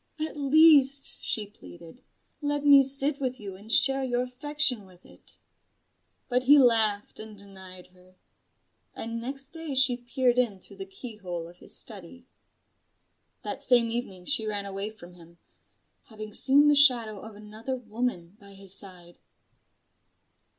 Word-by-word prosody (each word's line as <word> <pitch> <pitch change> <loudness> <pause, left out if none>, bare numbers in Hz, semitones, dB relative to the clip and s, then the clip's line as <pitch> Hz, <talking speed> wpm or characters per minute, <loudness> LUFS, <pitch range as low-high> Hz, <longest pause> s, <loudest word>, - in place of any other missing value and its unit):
At 315 +1 -5
least," 285 -1 +3
she 215 - -1
pleaded, 165 - -16 0.4
"let 290 0 -3
me 285 -1 +7
sit 275 +2 0
with 255 -1 -4
you 200 -3 -9
and 205 +4 -10
share 270 +2 +4
your 245 -1 -2
affection 255 -3 +2
with 185 -1 -21
it." - - -13 0.9
But 250 0 0
he 290 +3 +6
laughed 220 -6 +2
and 215 -1 -9
denied 190 -2 -14
her: 185 0 -24 0.8
and 230 0 -6
next 275 +3 -7
day 325 -4 -8
she 260 -2 +3
peered 245 0 -1
in 220 -6 -1
through - - -18
the 385 - -9
keyhole 210 - -9
of 175 +1 -17
his - - -2
study. 220 +4 -7 1.2
That - - -6
same 240 -3 +2
evening 195 -7 -6
she 230 -7 0
ran 205 -1 -4
away 195 +1 -6
from 180 -5 -15
him: 170 -1 -18 0.7
having 215 -1 -11
seen 285 +5 +5
the 295 - +4
shadow 245 -7 +4
of 220 +1 -12
another 215 +5 -7
woman 215 -6 -5
by 200 0 -16
his 195 -1 -2
side. 180 -3 -5
230 Hz, 150 wpm, -26 LUFS, 195-270 Hz, 1.2 s, me